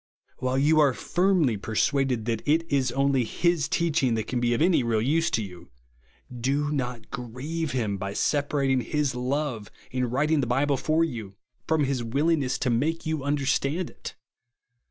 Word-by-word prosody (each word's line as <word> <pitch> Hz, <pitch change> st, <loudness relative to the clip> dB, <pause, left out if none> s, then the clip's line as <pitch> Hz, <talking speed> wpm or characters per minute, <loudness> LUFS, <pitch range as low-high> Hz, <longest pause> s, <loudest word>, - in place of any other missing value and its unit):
While 130 Hz, +1 st, 0 dB
you 155 Hz, +3 st, +4 dB
are 140 Hz, -4 st, +4 dB
firmly 175 Hz, -, +1 dB
persuaded 125 Hz, +3 st, 0 dB
that 115 Hz, -2 st, -1 dB
it 160 Hz, +3 st, +3 dB
is 135 Hz, -3 st, +2 dB
only 135 Hz, -1 st, +2 dB
his 170 Hz, +5 st, 0 dB
teaching 155 Hz, -8 st, +1 dB
that 110 Hz, -, -2 dB
can 125 Hz, -, -2 dB
be 120 Hz, 0 st, +1 dB
of -, -, -2 dB
any 170 Hz, -2 st, +4 dB
real 115 Hz, -2 st, +1 dB
use 160 Hz, +8 st, +1 dB
to 110 Hz, -, 0 dB
you, 90 Hz, -3 st, -11 dB, 0.7 s
do 140 Hz, +5 st, 0 dB
not 125 Hz, -5 st, -4 dB
grieve 140 Hz, +5 st, -4 dB
him 110 Hz, -6 st, -1 dB
by 100 Hz, 0 st, -4 dB
sepa 145 Hz, +6 st, 0 dB
ratino' 135 Hz, -3 st, +1 dB
his 150 Hz, -1 st, -1 dB
love, 125 Hz, -3 st, -2 dB, 0.2 s
in 125 Hz, -1 st, -1 dB
writing^ 145 Hz, +4 st, +1 dB
the 125 Hz, -, -2 dB
Bible 135 Hz, +3 st, +1 dB
for 155 Hz, +5 st, +1 dB
you, 110 Hz, -11 st, -5 dB, 0.3 s
from 160 Hz, -2 st, +2 dB
his 135 Hz, -3 st, -1 dB
willingness 140 Hz, +2 st, +1 dB
to 125 Hz, -, 0 dB
make 155 Hz, +8 st, 0 dB
you 155 Hz, -3 st, -2 dB
un 145 Hz, +1 st, +1 dB
derstand 145 Hz, +5 st, 0 dB
it. -, -, -9 dB
135 Hz, 175 wpm, -26 LUFS, 120-150 Hz, 0.7 s, you